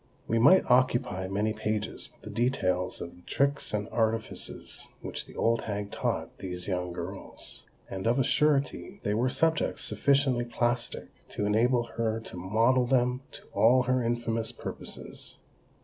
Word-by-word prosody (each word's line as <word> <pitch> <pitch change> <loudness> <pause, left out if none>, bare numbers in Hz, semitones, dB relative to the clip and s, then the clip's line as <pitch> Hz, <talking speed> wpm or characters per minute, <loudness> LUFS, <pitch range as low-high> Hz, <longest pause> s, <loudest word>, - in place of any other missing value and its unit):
We 115 - +2
might 165 +11 +7
occupy 125 -6 +2
many 105 +3 0
pages 110 -1 -2
with - - -29
the - - -7
details 95 -7 0
of 85 - -7
the - - -17
tricks 140 +8 0
and 105 -1 -1
artifices 110 -1 -2 0.2
which - - -5
the - - -13
old 115 0 +2
hag 100 -1 -3
taught - - -2
these 90 -1 -4
young 90 -2 -1
girls. 90 +3 -5 0.2
And 95 +3 -4
of 120 +2 +3
a 135 - +4
surety, 150 +8 +1
they 105 - +1
were 120 +4 +2
subjects 160 +4 +1
sufficiently 135 -4 +2
plastic 120 0 -1 0.2
to 105 - -2
enable 120 +4 +3
her 115 -1 +1
to 110 - -9
model 115 +8 +3
them 125 0 +2
to - - -8
all 125 +3 +5
her 130 0 +2
infamous 115 -1 -1
purposes. - - -6
115 Hz, 155 wpm, -29 LUFS, 105-125 Hz, 0.2 s, might